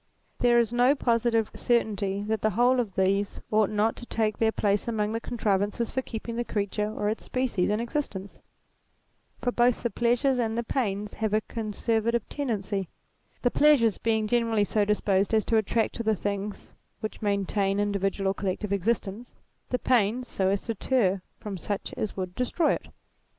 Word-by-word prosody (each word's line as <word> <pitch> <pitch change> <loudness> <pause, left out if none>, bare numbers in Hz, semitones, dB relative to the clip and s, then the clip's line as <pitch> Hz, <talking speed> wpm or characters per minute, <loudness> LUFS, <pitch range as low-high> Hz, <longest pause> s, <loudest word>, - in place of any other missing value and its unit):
There 240 -1 +4
is 235 -1 +2
no 250 +4 +4
positive 230 -3 +1
certainty 205 -4 0
that 220 0 -1
the 215 - +3
whole 245 +5 +3
of 215 -6 -2
these 195 +1 +1
ought 215 -2 +3
not 215 +1 +1
to 240 - -9
take 215 -2 0
their 225 -1 +3
place 205 -1 0
among 215 -2 0
the 225 - -1
contrivances 210 0 -1
for 260 - -1
keeping 230 -1 -6
the 240 - 0
creature 210 -1 -2
or 210 - -2
its 215 +2 -2
species 250 -8 0
in 210 +1 +1
existence; 230 -6 -4 1.0
for 245 - +1
both 240 0 +2
the 235 - 0
pleasures 245 +2 +2
and 225 -1 0
the 235 - 0
pains 210 -4 -2
have 215 -1 -1
a 215 - +2
conservative 225 +1 -1
tendency; 205 - -2 0.5
the 245 - +3
pleasures 275 -8 +4
being 220 -1 +1
generally 230 -1 +2
so 205 0 +1
disposed 205 0 +2
as 215 - +2
to 225 - +2
attract 220 +1 +1
to 230 - -2
the 220 -1 +2
things 200 +1 -4 0.3
which 215 - -5
maintain 200 -1 0
individual 195 -1 0
or - - -2
collective 200 +1 -2
existence, 205 +3 -2 0.3
the 250 - +1
pains 245 0 +1
so 190 - 0
as 195 0 +1
to 230 - -3
deter 200 -4 +1 0.2
from 200 -3 -6
such 200 +4 -4
as 210 - -3
would 185 -1 -3
destroy 255 - +1
it. - - -5
220 Hz, 175 wpm, -27 LUFS, 200-235 Hz, 1.0 s, There